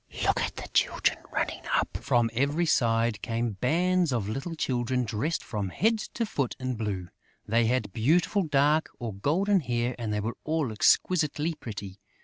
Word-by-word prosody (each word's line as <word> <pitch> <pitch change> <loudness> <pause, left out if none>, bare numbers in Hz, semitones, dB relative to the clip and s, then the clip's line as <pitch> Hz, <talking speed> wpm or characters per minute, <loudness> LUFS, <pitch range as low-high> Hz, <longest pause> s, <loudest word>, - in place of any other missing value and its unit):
Look - - +2
at - - -2
the - - -6
children - - +2
running - - -2
up!" - - 0
From 120 -2 +1
every 140 +7 +1
side 115 -6 +2
came 115 0 -1
bands 175 +4 +2
of 115 -6 -1
little 135 +10 -4
children 125 -3 0
dressed 120 +9 -2
from 105 -4 -3
head 220 - +1 0.2
to 235 - 0
foot 140 - -2
in 130 0 -2
blue; 100 -6 -3 0.4
they 115 +1 +3
had 115 -5 0
beautiful 165 - +2
dark 150 -1 +2
or 115 -4 -4
golden 185 - +2
hair 120 -4 -1
and 115 -3 -2
they 105 - 0
were 110 +3 -3
all 155 -6 0
exquisitely 155 +6 +2
pretty. 100 -8 -8
125 Hz, 165 wpm, -28 LUFS, 115-160 Hz, 0.4 s, they